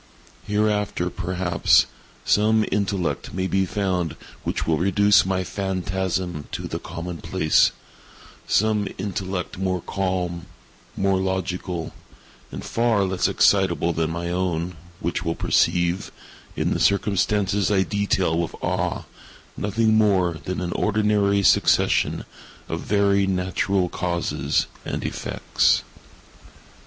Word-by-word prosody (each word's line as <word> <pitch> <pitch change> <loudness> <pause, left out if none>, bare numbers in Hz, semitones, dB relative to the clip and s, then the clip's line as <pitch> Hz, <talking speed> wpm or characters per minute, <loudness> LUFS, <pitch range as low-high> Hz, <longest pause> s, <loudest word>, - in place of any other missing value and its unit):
Hereafter, 105 -4 0
perhaps, 90 0 +2 0.4
some 110 +1 +3
intellect 100 -4 -1
may 95 0 -1
be 95 0 +1
found 90 -7 -1 0.3
which - - -2
will 80 -2 +1
reduce 100 +2 +4
my 95 -1 0
phantasm 95 -3 -2
to - - -4
the - - -4
common 85 +1 -6
place—some 105 +6 0
intellect 95 -2 -4
more 95 -1 0
calm, 90 -1 -3 0.5
more 95 -1 +2
logical, 90 -2 -3 0.6
and - - -7
far 115 -3 +1
less 95 -1 +1
excitable 85 -4 +3
than 80 0 0
my 85 +1 -3
own, 90 -1 -1 0.2
which 85 - -2
will 80 0 -1
perceive, 85 +1 +1 0.4
in - - 0
the - - -2
circumstances 100 0 +2
I 95 -2 +3
detail 100 -5 0
with 85 - -3
awe, - - -1 0.5
nothing 110 +2 +2
more 95 -6 +2
than 90 0 -3
an 90 -1 -3
ordinary 105 -1 +2
succession - - +3 0.4
of - - -3
very 100 -1 +2
natural 95 0 0
causes 85 -6 -1 0.2
and - - -4
effects. - - +1
95 Hz, 110 wpm, -23 LUFS, 90-100 Hz, 0.6 s, reduce